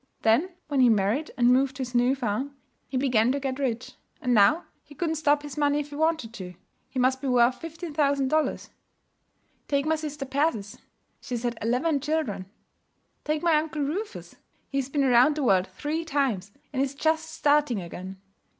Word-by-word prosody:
Then 235 +12 +3 0.2
when 285 -2 0
he 250 -2 +6
married 220 +8 +1
and 240 -1 +4
moved 265 +1 +2
to 265 - -5
his 250 0 -7
new 245 +2 +3
farm, 265 +3 -3 0.3
he 260 - -3
began 250 -3 +3
to 285 - -1
get 265 -1 -3
rich; 255 -1 -2 0.3
and 250 - 0
now 225 - +5 0.2
he 290 - -16
couldn't 325 +1 -1
stop 295 -2 +2
his 290 0 -6
money 290 0 +2
if 295 0 -4
he - - -7
wanted 315 -7 0
to. 180 -5 -8 0.3
He - - -8
must 260 +1 +2
be 280 - -3
worth 250 0 +3
fifteen 330 0 -7
thousand 280 -3 +2
dollars. 310 +1 0 1.0
'Take 280 0 +1
my 320 +1 +2
sister 300 -2 -5
Persis. 265 -7 -1 0.4
She's 245 -1 -5
had 240 -1 -1
eleven 260 +7 +1
children. 265 -11 -2 0.8
'Take 305 +1 -1
my 335 -2 +4
uncle 305 -1 -2
Rufus. 400 +10 -5 0.3
He's 275 -2 -1
been 280 0 +1
around 255 +3 +5
the 300 - -2
world 190 -6 +3
three 310 +3 -3
times, 270 - -1 0.2
and 265 - 0
is 275 0 -1
just 315 +2 0
starting 295 -6 +2
again. 185 +2 -8
275 Hz, 185 wpm, -26 LUFS, 245-300 Hz, 1.0 s, he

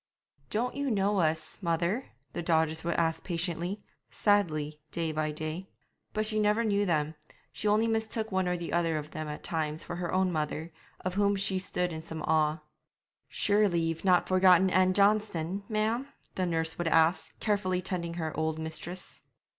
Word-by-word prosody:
'Don't 240 +4 0
you 280 0 -1
know 200 -2 +2
us, 155 -1 0
mother?' 170 +7 0 0.3
the - - -3
daughters 160 -1 +1
would 170 0 -1
ask 165 -1 +1
patiently, 175 +2 -2 0.3
sadly, 155 -8 +1
day 165 -2 -1
by 155 0 -1
day. 155 +5 -5 0.4
But 215 0 0
she 215 0 0
never 210 +2 +3
knew 205 -2 +1
them; 155 -2 +1 0.4
she 215 - -3
only 210 +2 +4
mistook 220 0 -1
one 190 -1 +1
or 180 0 0
the 170 -1 -5
other 165 -2 +2
of 150 0 -6
them 155 0 -5
at 150 0 -6
times 155 -1 -2
for 175 - -5
her 175 -1 -3
own 185 0 +2
mother, 155 +1 -2 0.3
of 185 - -2
whom 200 +1 +2
she 190 -1 0
stood 180 -1 -1
in 160 - -5
some 160 -1 -6
awe. 155 0 +2 0.7
'Surely 205 -4 +3
ye've 165 0 -2
not 180 -2 +4
forgotten 185 0 +5
Ann 185 0 +4
Johnston, 200 -3 +2
ma'am?' 220 +4 0 0.3
the 185 -1 -1
nurse 160 -1 -1
would 175 - 0
ask, 165 +2 +2
carefully 190 -3 +1
tending 175 -2 -3
her 160 -2 -3
old 160 0 -1
mistress. 160 +3 -4
175 Hz, 175 wpm, -30 LUFS, 160-200 Hz, 0.7 s, forgotten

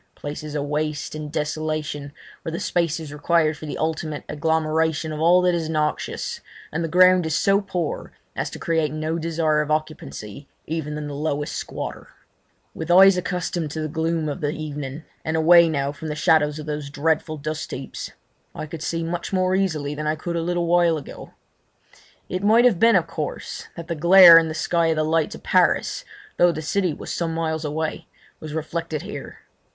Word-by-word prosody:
Places 150 +1 -6
of 145 -1 -1
waste 150 0 -2
and 155 -1 -6
desolation, 150 -2 -3 0.3
where 165 - -5
the 165 - -4
space 170 -2 0
is 155 -3 -8
required 155 +1 +2
for 155 - -9
the - - -4
ultimate 155 -1 -2
agglomeration 160 0 0
of 155 - -5
all 175 +3 +5
that 180 -1 +3
is 165 -2 -2
noxious, 155 -1 -2 0.3
and 160 +2 -2
the - - -1
ground 180 0 +5
is 160 - -1
so 200 +1 +3
poor 180 -5 -4 0.2
as - - -2
to - - -8
create 160 -3 0
no 155 +2 -2
desire 160 -2 +1
of 150 - -4
occupancy 145 - -4 0.2
even 150 -1 -3
in 150 - -5
the 145 - -6
lowest 145 0 -2
squatter. - - -6 0.7
With 160 +1 -6
eyes 190 +2 +8
accustomed 180 -3 -2
to 155 +2 -4
the 155 - -2
gloom 160 +1 -1
of 150 +4 -4
the 145 - 0
evening, 150 -1 -5 0.2
and 160 +1 -1
away 170 +1 +6
now 140 -2 -1
from 155 +2 -8
the 150 - -3
shadows 150 -1 +3
of 155 - -7
those 150 -2 -4
dreadful 155 +2 0
dustheaps, 150 -3 -5 0.4
I - - -5
could 155 0 -8
see 165 0 -2
much 170 +1 -4
more 185 -1 +1
easily 160 -7 0
than 150 +1 -4
I 155 - +1
could 170 +2 -4
a 170 - 0
little 175 +1 -1
while 170 -1 +3
ago. 145 - -10 0.9
It 185 - -3
might 225 +4 +5
have 220 -9 +4
been, 230 0 +5
of - - +3
course, - - -5
that 170 -1 -8
the 170 - -2
glare 170 +1 +9
in 165 - -1
the 155 - -5
sky 170 +1 +1
of 160 - +2
the 155 - +1
lights 160 0 0
of - - -13
Paris, - - +2 0.3
though 175 0 +5
the 155 -1 -5
city 185 +2 0
was - - -6
some 165 -1 -2
miles 160 -1 -2
away, 160 +2 -3 0.3
was 155 -1 -7
reflected 160 -1 -3
here. - - -8
160 Hz, 195 wpm, -23 LUFS, 150-170 Hz, 0.9 s, glare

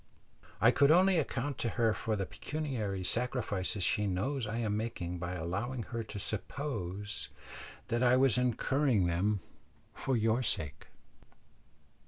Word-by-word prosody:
I 115 - +6
could 140 +2 +4
only 180 +2 +6
account 140 -1 -2
to 115 - 0
her 115 -2 +3
for 110 0 -1
the 100 -2 -1
pecuniary 115 -10 -3
sacrifices 110 -3 -1
she 105 +3 +2
knows 115 +7 -1
I 110 +2 -3
am 110 -3 0
making 90 -6 -3
by 85 +1 -3
allowing 100 +9 -3
her 115 - -1
to 110 - -8
suppose 105 -2 -4 0.6
that 120 +1 +1
I 125 0 +5
was 130 -3 +4
incurring 125 -2 +2
them 95 +4 +1 0.5
for 130 -2 0
your 115 +2 +2
sake." 80 - -2
115 Hz, 140 wpm, -32 LUFS, 100-130 Hz, 0.6 s, I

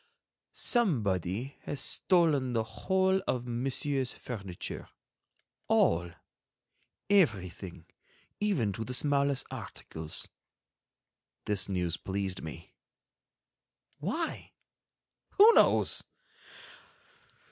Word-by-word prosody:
"Somebody 115 - 0
has 145 - -3
stolen 155 -8 +2
the 115 -1 +1
whole 190 - +1
of 125 -1 -1
Monsieur's 130 +2 -1
furniture, 100 -7 -7 0.8
all, 85 +1 +3 1.0
everything, 95 - +1 0.5
even 160 - +1
to 110 - -4
the 125 +3 -1
smallest 140 0 +2
articles." 80 -1 -8 1.2
This 100 -2 +1
news 90 -3 -1
pleased 95 -1 -3
me. 80 +1 -9 1.3
Why? 230 - -3 0.8
Who 430 +3 +8
knows? - - +4
120 Hz, 75 wpm, -30 LUFS, 95-145 Hz, 1.3 s, Who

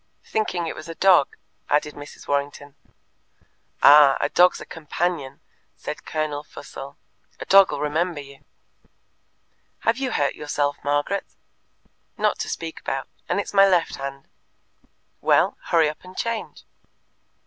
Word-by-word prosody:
"Thinking 185 -6 -1
it 165 - -3
was 155 - -10
a 165 - -6
dog," 185 -7 +4 0.3
added 150 0 +1
Mrs. 145 0 -12
Warrington. 145 0 -2 1.1
"Ah, 145 -2 +8
a - - 0
dog's 180 +1 +4
a - - -9
companion!" 160 -3 -3 0.3
said - - -7
Colonel 155 -2 -2
Fussell. 140 -1 -10 0.4
"A - - -6
dog'll 195 0 +6
remember 155 +2 -1
you." 140 -1 -12 1.4
"Have 230 +2 +1
you 265 -1 -1
hurt 145 -1 +1
yourself, 145 -1 -1
Margaret?" 145 +7 -1 0.9
"Not - - +1
to - - -3
speak 165 -1 -5
about; 135 0 -4 0.2
and - - +1
it's 205 - -4
my 195 0 +7
left 180 -3 +1
hand." 140 0 -7 0.9
"Well, - - +3
hurry 165 -2 +3
up 150 - -6
and 185 0 -13
change." 230 -2 -4
150 Hz, 135 wpm, -23 LUFS, 145-180 Hz, 1.4 s, Ah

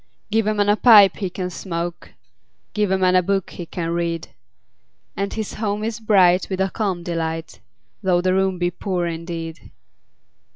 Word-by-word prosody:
Give 220 0 +1
a 215 - +1
man 205 -1 +1
a 205 - +4
pipe 215 -4 +7
he 195 -3 -3
can 180 0 -5
smoke, 170 -1 -5
5 - - -27 0.6
Give 210 -2 0
a 190 - +2
man 185 -1 +3
a 185 - +6
book 195 +1 -1
he 175 - -8
can 165 -1 -4
read: 170 -1 -2 0.9
And 200 0 -2
his 220 -2 -4
home 210 -1 -2
is 220 0 -3
bright 190 -5 +4
with 190 -1 -3
a 190 -1 0
calm 190 -5 -2
delight, 165 -1 -4 0.4
Though 185 -3 +2
the 185 0 +1
room 190 -1 +1
be 175 0 0
poor 180 -1 -2
indeed. 165 -1 -6
185 Hz, 180 wpm, -21 LUFS, 170-205 Hz, 0.9 s, pipe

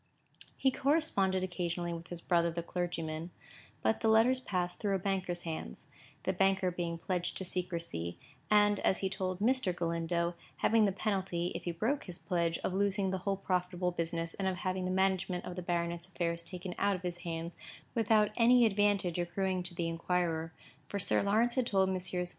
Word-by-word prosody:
He 265 - +3
corresponded 255 - +2
occasionally 175 -1 -2
with 165 0 -7
his 175 -1 -6
brother 170 -1 +2
the 170 0 -3
clergyman; 165 -2 -3 0.5
but 220 - +2
the 225 - +1
letters 225 +4 +5
passed 180 -7 -2
through 200 -3 +1
a - - +2
banker's 185 -2 -2
hands; 160 - -5 0.4
the 190 - 0
banker 190 0 +2
being 170 -1 -3
pledged 180 +1 -1
to 190 - 0
secrecy, 170 - -2 0.3
and, 205 -1 +5
as 190 - +2
he 190 - +1
told 185 -2 -2
Mr. 230 -4 +2
Galindo, 170 0 0 0.2
having 225 -1 +4
the 200 - +2
penalty, 190 -3 -1
if - - -6
he 175 - 0
broke 235 - -1
his 180 -2 -6
pledge, 170 -4 0
of - - -1
losing 195 0 +1
the 190 - -1
whole 195 +1 -1
profitable 180 -1 -1
business, 165 -1 -2
and 195 - -2
of 190 - 0
having 185 0 -2
the - - -1
management 185 -1 +1
of 180 - -5
the 180 - -4
baronet's 170 0 -2
affairs 170 -2 -2
taken 180 +1 -6
out 200 -1 +3
of 185 - -8
his 175 -1 -3
hands, 170 -1 -4 0.4
without 215 -2 +3
any 245 +1 +6
advantage 200 -4 +2
accruing 185 +1 -1
to 175 0 -7
the 170 -1 -1
inquirer, 165 -1 -1 0.4
for 205 - -3
Sir 195 - +2
Lawrence 220 +4 +2
had 255 -3 +1
told 190 -2 +3
Messrs. 180 -1 -2
180 Hz, 185 wpm, -32 LUFS, 170-195 Hz, 0.5 s, any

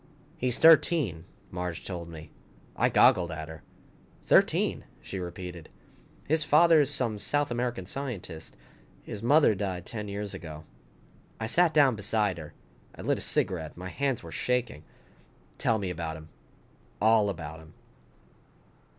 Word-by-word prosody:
"He's 125 -1 +1
thirteen," 150 - +4 0.3
Marge 90 -2 -5
told 85 -3 -6
me. 80 -1 -11 0.4
I - - +2
goggled 85 -2 +4
at 80 0 -6
her. 80 -1 -10 0.6
"Thirteen," - - +3
she 95 - -7
repeated. 90 -2 -7 0.6
"His 155 +1 +2
father 155 +1 +5
is 145 0 +1
some 115 -7 0
South 145 +5 0
American 120 -5 -2
scientist. 100 - -7 0.5
His 105 - -7
mother 140 0 +5
died 95 -3 -4
ten 105 -2 -6
years 100 0 -5
ago." 80 -2 -8 0.8
I 110 - -2
sat 170 +8 +3
down 140 -6 +4
beside 105 -3 0
her. 75 -2 -10 0.4
I - - -9
lit - - 0
a - - -5
cigarette. 80 -4 -1
My 90 +1 -6
hands 135 0 -2
were 85 - -9
shaking. 125 -10 -2 0.8
"Tell 115 - +2
me 95 -3 -3
about 80 -2 -4
him. 80 0 -13 0.7
All 110 -1 +4
about 80 -4 -6
him." 80 -1 -16
100 Hz, 140 wpm, -28 LUFS, 85-125 Hz, 0.8 s, father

